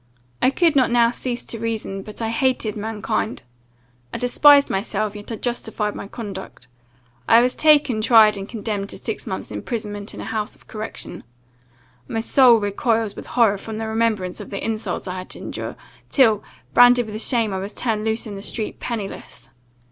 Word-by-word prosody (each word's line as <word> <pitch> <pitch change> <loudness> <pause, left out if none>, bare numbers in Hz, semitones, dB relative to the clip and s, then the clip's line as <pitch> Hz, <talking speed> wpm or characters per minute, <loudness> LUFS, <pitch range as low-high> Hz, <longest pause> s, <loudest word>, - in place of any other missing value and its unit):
I - - +5
could 325 +2 +2
not 260 -3 +4
now 235 -1 +4
cease 245 -1 -3
to 230 - -5
reason, 220 -4 -3
but 215 +3 -8
I 225 - -1
hated 230 -2 0
mankind. 215 - -3 0.7
I - - -4
despised 280 +3 +6
myself, 210 +1 -2
yet 205 +2 -8
I - - -2
justified 220 -2 -2
my - - -7
conduct. 195 - -8 0.6
I 230 - +8
was 250 +1 +2
taken, 290 -7 +4
tried, 220 -2 +6
and 195 0 -6
condemned 210 -3 -3
to - - -5
six - - -5
months' - - -5
imprisonment 210 -4 -5
in - - -9
a - - -6
house 220 -2 -3
of - - -23
correction. 215 0 -7 0.8
My 225 - -2
soul 245 +1 +6
recoils 220 +1 0
with - - -9
horror 220 -5 +3
from 220 +1 -6
the 225 - -3
remembrance 220 -5 -1
of - - -8
the 200 - -5
insults 220 -2 -3
I 185 0 -4
had 185 - -9
to - - -6
endure, - - -6 0.3
till, 225 -7 +4 0.3
branded 245 0 +6
with 215 0 -5
shame, 230 -5 +1
I 190 - -2
was 195 +2 -6
turned 220 -3 -1
loose 220 +1 0
in 215 - -7
the 195 - -7
street, 215 +1 -4
pennyless. 220 -5 -6
220 Hz, 185 wpm, -22 LUFS, 210-240 Hz, 0.8 s, I